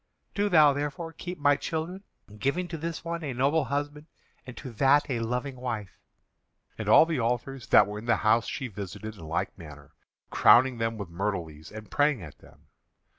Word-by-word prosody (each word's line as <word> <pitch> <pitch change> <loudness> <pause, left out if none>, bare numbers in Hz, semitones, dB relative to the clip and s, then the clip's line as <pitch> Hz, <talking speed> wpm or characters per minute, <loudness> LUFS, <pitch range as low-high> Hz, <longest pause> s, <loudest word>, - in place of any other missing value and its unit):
Do 205 0 0
thou 155 -5 +6
therefore 150 +4 -4
keep 180 +3 -7
my 145 -1 +4
children, 165 +6 -4 0.4
giving 170 +9 0
to 165 - -5
this 165 +1 -5
one 170 0 -4
a 140 -4 -3
noble 140 +4 +2
husband 145 +2 -4 0.4
and 125 - -9
to 130 - -8
that 135 +5 +3
a 120 - -1
loving 125 +4 -3
wife." 115 -7 -5 0.8
And - - -4
all - - +8
the 165 -4 -2
altars 120 +1 -2
that - - +6
were 105 +1 -6
in 110 - -10
the 115 - +4
house 115 +2 +3
she 135 - -4
visited 105 0 -7
in 95 - -13
like 80 +2 -2
manner, 75 -2 -12 0.4
crowning 125 0 +5
them 115 0 -1
with 100 -4 -6
myrtle 95 +1 -2
leaves 80 +1 -13
and 110 0 -10
praying 145 -8 +2
at 75 -3 -12
them. 75 +4 -20
130 Hz, 190 wpm, -27 LUFS, 105-150 Hz, 0.8 s, all